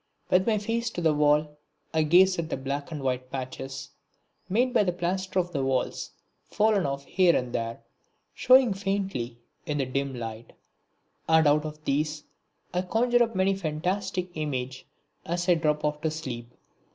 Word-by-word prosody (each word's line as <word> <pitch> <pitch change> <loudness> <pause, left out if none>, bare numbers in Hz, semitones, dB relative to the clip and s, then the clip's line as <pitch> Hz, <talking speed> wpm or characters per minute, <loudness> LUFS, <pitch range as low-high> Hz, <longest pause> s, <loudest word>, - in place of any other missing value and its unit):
With 185 +3 +4
my 220 -2 +3
face 230 +3 -1
to 175 - -5
the 160 -2 +3
wall 150 0 +2 0.3
I 160 - +3
gaze 180 +4 +5
at 160 -1 -3
the - - -2
black 140 +3 -4
and 150 -4 -5
white 130 -1 -1
patches, 135 +1 -6 0.6
made 245 +6 +2
by 245 - +5
the 180 - +1
plaster 185 +2 -2
of 180 -1 +1
the 140 -5 -1
walls 130 -1 -1 0.4
fallen 210 -6 +2
off 140 0 -4
here 180 -2 +3
and 125 -1 -1
there, 115 -1 -3 0.5
showing 255 -4 +5
faintly 195 -12 -2 0.3
in 150 - -1
the 135 - 0
dim 135 +1 -2
light; 115 -1 -7 0.8
and 160 0 +5
out 150 +1 +4
of 155 0 -8
these 150 +2 -1 0.5
I 180 - +1
conjure 240 +6 +2
up 230 -2 +1
many 190 +1 +3
a - - 0
fantastic 180 +2 -2
image 130 -5 -4 0.4
as 175 +2 -2
I 180 - +6
drop 150 -2 0
off 150 0 -1
to 160 - +1
sleep. 120 -7 -6
155 Hz, 175 wpm, -27 LUFS, 140-190 Hz, 0.8 s, I